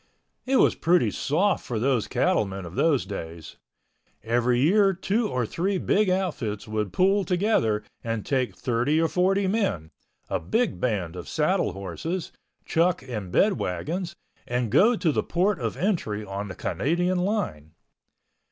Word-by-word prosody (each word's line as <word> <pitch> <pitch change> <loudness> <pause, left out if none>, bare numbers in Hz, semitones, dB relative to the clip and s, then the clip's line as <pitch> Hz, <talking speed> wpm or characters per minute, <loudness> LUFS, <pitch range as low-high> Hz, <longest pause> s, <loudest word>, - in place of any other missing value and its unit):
It 270 - +2
was - - +5
pretty 165 -10 +2
soft 180 - +1
for 120 - -4
those 125 -1 +1
cattlemen 100 - 0
of 85 - -9
those 150 - +2
days. 85 -5 -7 0.7
Every 120 +2 +1
year 195 +7 +4
two 210 +4 0
or 125 -2 -1
three 190 - -1
big 205 +2 +2
outfits 150 - -2
would 105 -2 -2
pool 195 +2 +3
together 175 - +1 0.2
and 115 -2 -3
take 130 -3 0
thirty 125 +5 +1
or 165 - +3
forty 190 +3 +1
men, 185 - -1 0.4
a - - -1
big 230 +1 0
band 95 -8 -1
of 90 - -8
saddle - - +1
horses, 100 - -5 0.3
chuck 170 -2 +1
and 105 -8 -6
bed 200 - +3
wagons, 170 - -3 0.3
and 120 -3 -1
go 215 - +5
to 170 -7 +1
the - - +1
Port 190 +4 0
of - - -3
Entry 135 - -1
on 100 +1 -5
the 95 - -7
Canadian 175 +5 0
line. 180 - -2
145 Hz, 150 wpm, -25 LUFS, -, 0.7 s, was